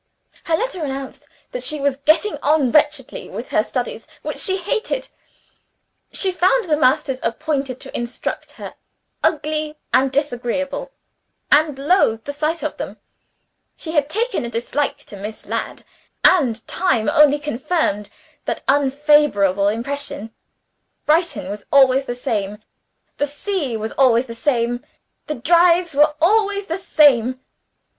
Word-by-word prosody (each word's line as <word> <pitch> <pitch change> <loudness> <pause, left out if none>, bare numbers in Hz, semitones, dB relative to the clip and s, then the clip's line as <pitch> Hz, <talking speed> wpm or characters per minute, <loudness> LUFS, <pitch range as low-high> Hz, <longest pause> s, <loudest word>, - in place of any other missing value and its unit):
Her 325 -1 +2
letter 420 -7 -3
announced 270 -2 -6 0.3
that - - -4
she 305 -2 -2
was 280 -1 0
"getting 310 +6 +2
on 290 -3 +2
wretchedly 300 - +1
with - - -7
her - - +3
studies - - -4 0.2
(which - - -4
she 380 -1 0
hated); 455 +6 -2 1.0
she 385 - -1
found 370 +7 +2
the 315 -6 +1
masters 260 -2 +2
appointed 270 +1 -2
to 270 - -9
instruct 240 +1 -4
her - - -9 0.5
ugly 305 0 0 0.2
and 260 +1 +3
disagreeable 280 - -2 0.6
(and 295 -1 +4
loathed 275 - +2
the 285 - -4
sight 310 +3 -2
of - - -3
them); - - -6 0.8
she 315 - -6
had 295 -3 +1
taken 460 - -1
a 235 - -4
dislike 240 +6 -2
to - - -10
Miss 210 +2 -7
Ladd - - -4 0.4
(and 250 - +3
time 295 -12 0
only 300 -2 +5
confirmed 295 - -1 0.4
that - - -3
unfavorable 275 -8 +3
impression); 230 -1 -3 0.7
Brighton 325 - +1
was 205 +1 -7
always 270 -1 +5
the 245 - -4
same; 210 -4 -2 0.6
the 290 - 0
sea 290 - -2
was 220 +1 -4
always 255 -2 +3
the 230 - -8
same; 240 0 0 0.4
the 300 - -2
drives 340 +4 +3
were 295 +2 +4
always 405 +3 +2
the 340 0 -3
same. 255 -8 +3
285 Hz, 135 wpm, -20 LUFS, 245-325 Hz, 1.0 s, only